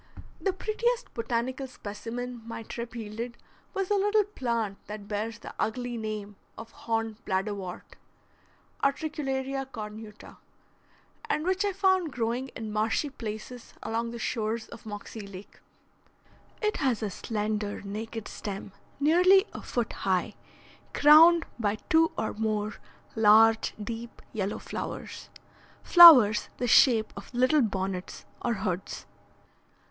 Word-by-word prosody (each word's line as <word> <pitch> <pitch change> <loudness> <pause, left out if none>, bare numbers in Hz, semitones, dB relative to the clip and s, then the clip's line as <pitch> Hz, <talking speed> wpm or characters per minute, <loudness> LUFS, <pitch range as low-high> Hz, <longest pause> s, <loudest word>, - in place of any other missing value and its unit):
The 390 - +1
prettiest 465 +6 -2
botanical 240 +3 -2
specimen 240 +2 -6
my 230 0 -7
trip 235 +2 -7
yielded 230 +2 -6 0.4
was 390 0 -2
a 410 - +4
little 415 +2 +3
plant 235 - -3
that 210 -1 -8
bears 220 +2 -3
the - - -10
ugly 245 +2 -2
name 215 -2 -5 0.2
of 225 0 -9
horned 225 -1 -3
bladderwort 190 -1 -4 0.9
(Utricularia 275 -2 -1
cornuta), 215 -3 -9 0.9
and 305 - 0
which 375 +2 +1
I 405 - +1
found 375 -4 +2
growing 240 +2 -2
in 220 -2 -5
marshy 220 +7 0
places 230 0 -8
along 230 +1 -2
the 235 - -6
shores 220 -1 -2
of - - -12
Moxie 205 0 -7
Lake. 195 0 -12 1.0
It 425 0 +1
has 255 -7 0
a 205 - -2
slender, 210 0 -3
naked 220 +2 -6
stem 200 -1 -6 0.3
nearly 365 +7 +5
a - - -7
foot 240 -3 -2
high, 190 +2 -1 0.6
crowned 325 +3 +7
by 210 -2 +1 0.2
two 325 0 +5
or 220 - -2
more 215 -1 -2 0.4
large 220 +1 +5
deep 225 +2 -7
yellow 200 -2 -2
flowers, - - -6 0.5
flowers 265 - +9
the 250 - -1
shape 230 -2 +5
of - - -10
little 255 +5 +4
bonnets 190 -4 -3 0.2
or 235 - 0
hoods. 190 -2 -4
230 Hz, 125 wpm, -28 LUFS, 210-270 Hz, 1.0 s, flowers